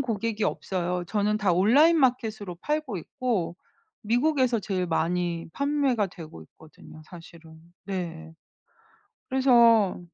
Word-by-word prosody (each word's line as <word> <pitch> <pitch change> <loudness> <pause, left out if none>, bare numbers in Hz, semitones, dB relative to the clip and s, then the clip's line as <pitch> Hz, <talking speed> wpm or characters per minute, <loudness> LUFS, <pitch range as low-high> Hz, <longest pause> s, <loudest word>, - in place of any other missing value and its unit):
고객이 225 -3 -2
없어요. 180 -1 -2
저는 210 0 0
다 205 -4 +1
온라인 275 - +4
마켓으로 225 - 0
팔고 300 -9 -2
있고 185 -2 -3 0.5
미국에서 245 +1 +1
제일 185 -3 -2
많이 170 0 -1
판매가 280 -6 0
되고 165 - -11
있거든요, 155 - -16
사실은. 165 -1 -14 0.3
네. 170 -4 -6 1.0
그래서 235 -7 +4
205 Hz, 260 characters per minute, -26 LUFS, 175-250 Hz, 1.0 s, 온라인